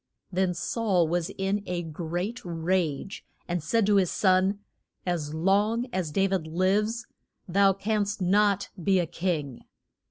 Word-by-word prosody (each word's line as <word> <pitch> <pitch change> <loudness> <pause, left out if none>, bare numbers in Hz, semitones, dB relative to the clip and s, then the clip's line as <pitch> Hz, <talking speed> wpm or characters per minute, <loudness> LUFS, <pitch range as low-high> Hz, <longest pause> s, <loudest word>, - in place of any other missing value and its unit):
Then 185 -1 +1
Saul 185 -1 +1
was 170 0 -1
in 195 +2 0
a 175 -1 -2
great 175 +7 -4
rage, 170 0 -1 0.2
and 175 -1 -1
said 225 +7 +2
to 205 0 +4
his 185 -3 +3
son, 190 +1 +3 0.5
As 160 -4 -2
long 205 +8 +2
as 185 -4 -1
Da 195 +5 +2
vid 190 -4 -1
lives 205 +7 +1 0.4
thou 195 +2 +4
canst 205 +1 -1
not 200 +1 +2
be 195 +1 +3
a 175 - +2
king. 155 -7 -3
185 Hz, 140 wpm, -27 LUFS, 175-200 Hz, 0.5 s, to